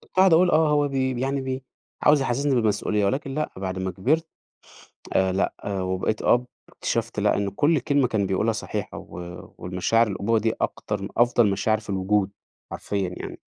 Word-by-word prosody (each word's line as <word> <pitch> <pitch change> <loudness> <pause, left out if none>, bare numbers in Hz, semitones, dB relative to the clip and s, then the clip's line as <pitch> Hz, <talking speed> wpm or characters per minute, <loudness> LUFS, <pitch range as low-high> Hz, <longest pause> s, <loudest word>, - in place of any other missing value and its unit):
كنت - - -24
أقعد 190 -2 +6
أقول 175 +2 +5
آه، 155 -1 +4
هو 145 -1 +3
بي 130 -2 -1
يعني 135 +1 0
بي 130 0 -4 0.4
عاوز 150 -1 +5
يحسّسني 135 +2 +1
بالمسؤولية، 105 -2 +1
ولكن 135 +5 -2
لأ، 155 +1 -1
بعد 95 -1 -4
ما 95 0 -2
كبرت 150 - 0 0.9
آآ، 95 0 +2
لأ 95 - 0
وبقيت 95 +2 -1
أب، 125 +1 +3 0.2
اكتشفت - - -2
لأ - - +3
إن 100 -1 -1
كُلّ 145 +10 +2
كلمة 140 -1 +2
كان 100 -3 0
بيقولها 105 +5 +1
صحيحة 110 - -4
و - - -12 0.5
والمشاعر 90 +6 +1
الأبوة 105 +2 0
دي 110 +1 +1
أكتر 100 -2 -2
أفضل 120 -3 +4
مشاعر 110 +3 +1
في 105 - -9
الوجود، 95 +1 +1 0.4
حرفيًا 100 -3 -2
يعني. - - -7
115 Hz, 175 wpm, -24 LUFS, 100-135 Hz, 0.9 s, أقعد